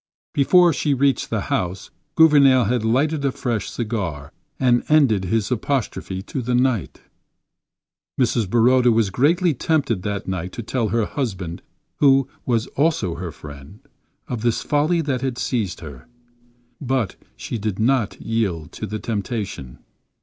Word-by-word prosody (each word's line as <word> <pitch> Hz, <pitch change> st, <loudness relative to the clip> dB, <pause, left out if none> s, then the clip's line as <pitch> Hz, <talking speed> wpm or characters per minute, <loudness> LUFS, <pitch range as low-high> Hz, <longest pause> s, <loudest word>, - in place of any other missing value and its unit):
Before 175 Hz, +4 st, +5 dB
she 145 Hz, 0 st, 0 dB
reached 135 Hz, +1 st, +1 dB
the -, -, -1 dB
house, 90 Hz, +1 st, -3 dB, 0.2 s
Gouvernail 140 Hz, -5 st, +6 dB
had 115 Hz, +1 st, 0 dB
lighted 140 Hz, +6 st, +1 dB
a 140 Hz, -, +1 dB
fresh 120 Hz, -5 st, -3 dB
cigar 95 Hz, -, -4 dB, 0.3 s
and 125 Hz, -2 st, +3 dB
ended 130 Hz, -11 st, +4 dB
his 110 Hz, +4 st, -1 dB
apostrophe 115 Hz, -6 st, -2 dB
to 130 Hz, -, -4 dB
the 125 Hz, +1 st, -1 dB
night. 125 Hz, -6 st, 0 dB, 1.2 s
Mrs. 115 Hz, -5 st, +1 dB
Baroda 120 Hz, +2 st, +4 dB
was 110 Hz, -3 st, +2 dB
greatly 165 Hz, -, +2 dB
tempted 135 Hz, -, 0 dB
that 100 Hz, 0 st, -4 dB
night 90 Hz, -1 st, -4 dB
to 120 Hz, -, -6 dB
tell 115 Hz, 0 st, -1 dB
her 115 Hz, 0 st, 0 dB
husband—who 125 Hz, -, -1 dB, 0.2 s
was 115 Hz, -2 st, +1 dB
also 145 Hz, -, +1 dB
her 85 Hz, 0 st, -6 dB
friend—of 75 Hz, -, -11 dB
this 120 Hz, -1 st, 0 dB
folly 155 Hz, +4 st, +1 dB
that 135 Hz, -5 st, -2 dB
had 130 Hz, -2 st, -2 dB
seized 110 Hz, -9 st, -2 dB
her. 70 Hz, -6 st, -10 dB, 0.7 s
But 130 Hz, -6 st, -1 dB, 0.2 s
she 85 Hz, -, -5 dB
did 105 Hz, -2 st, -3 dB
not 115 Hz, -1 st, +1 dB
yield 95 Hz, -9 st, -2 dB
to -, -, -6 dB
the 110 Hz, -, -4 dB
temptation. 105 Hz, -, -4 dB
120 Hz, 140 wpm, -21 LUFS, 100-135 Hz, 1.2 s, Gouvernail